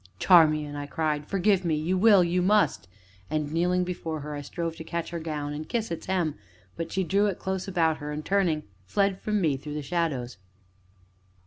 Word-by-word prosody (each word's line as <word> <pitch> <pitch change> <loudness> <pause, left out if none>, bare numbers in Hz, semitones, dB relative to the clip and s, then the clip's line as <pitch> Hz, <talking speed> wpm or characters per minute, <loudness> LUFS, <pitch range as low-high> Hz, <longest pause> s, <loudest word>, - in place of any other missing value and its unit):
"Charmian," 155 - +4
I 145 0 -5
cried, 150 -1 -1
"forgive 195 0 +2
me 165 -3 +1
you 160 +5 0
will, 200 -1 +6
you 175 +1 +1
must!" 200 - +2 0.4
and, 150 -1 -2
kneeling 180 +3 +1
before 165 -3 -4
her, 150 +1 -6
I 145 - -4
strove 165 +3 -4
to - - -7
catch 170 +1 -4
her 170 - -3
gown, 150 -2 -4
and 155 +1 -6
kiss 225 -5 -2
its 165 - -5
hem, 180 -5 0 0.4
but 165 - -5
she 190 - 0
drew 200 +4 +2
it 195 - -2
close 190 0 -3
about 165 -4 +1
her, 150 0 -6
and, 150 +1 -5
turning, 175 -6 +1 0.2
fled 195 - 0
from 210 -1 0
me 155 -7 +1
through 145 +2 -7
the 150 - -3
shadows. 140 - -2
165 Hz, 200 wpm, -27 LUFS, 150-185 Hz, 0.4 s, will